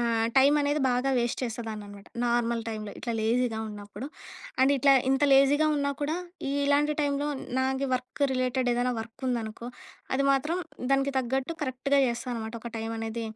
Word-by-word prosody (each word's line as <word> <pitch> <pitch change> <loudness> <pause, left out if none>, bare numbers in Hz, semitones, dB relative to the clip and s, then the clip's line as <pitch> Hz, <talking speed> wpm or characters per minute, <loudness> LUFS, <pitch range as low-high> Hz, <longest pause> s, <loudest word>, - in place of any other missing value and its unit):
ఆహ్, 230 -1 +1
టైమ్ 280 +3 +6
అనేది 290 +1 +1
బాగా 250 +2 +1
వేస్ట్ 240 +1 -1
చేసేదాన్ని 225 -3 -5
అన్నమాట. 200 0 -12 0.2
నార్మల్ 235 -1 +1
టైమ్‌లో 215 -2 -5
ఇట్లా 235 - -3
లేజీగా 230 0 +1
ఉన్నప్పుడు. 205 +4 -8 0.5
అండ్ 270 +2 +5
ఇట్లా 275 +1 +5 0.2
ఇంత 270 +2 +3
లేజీగా 280 +3 +5
ఉన్నా 280 0 0
కూడా 310 +4 0 0.3
ఇలాంటి 285 +1 +2
టైమ్‌లో 285 0 0 0.3
నా 260 - +2 0.3
వర్క్ 255 +3 -4
రిలేటెడ్ 255 -1 0
ఏదైనా 245 +1 +1
వర్క్ 230 +4 -9
ఉందనుకో, 235 0 -3 0.5
అది 275 +1 +2
మాత్రం 300 +6 0 0.3
దానికి 275 0 +2
తగ్గట్టు 265 +5 -1
కరెక్ట్‌గా 275 +1 +1
చేస్తా 235 +1 -3
అనమాట 220 0 -5
ఒక 235 - -6
టైమ్ 225 +1 -3
అనేది 225 +1 -3
250 Hz, 160 wpm, -28 LUFS, 230-275 Hz, 0.5 s, టైమ్